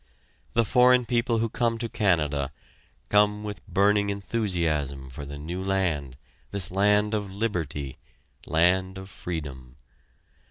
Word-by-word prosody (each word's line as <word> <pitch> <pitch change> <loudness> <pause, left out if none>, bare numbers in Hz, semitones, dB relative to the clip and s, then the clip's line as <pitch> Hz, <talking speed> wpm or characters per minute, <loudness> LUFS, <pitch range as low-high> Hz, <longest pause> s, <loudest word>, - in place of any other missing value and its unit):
The 115 0 +3
foreign 125 +1 +5
people 120 -1 +1
who 115 +1 +1
come 115 0 0
to 115 0 -3
Canada, 75 -10 +1 0.6
come 105 0 +3
with 105 -3 -6
burning 100 +1 +3
enthusiasm 85 - -1
for 70 +3 -7
the 70 +1 -7
new 85 +6 -5
land, 85 -9 -1 0.3
this 100 -4 0
land 105 +2 +3
of 105 -2 -1
liberty 80 - -3 0.5
land 95 +3 +2
of 95 0 -9
freedom. 70 -7 -6
95 Hz, 125 wpm, -26 LUFS, 75-105 Hz, 0.6 s, foreign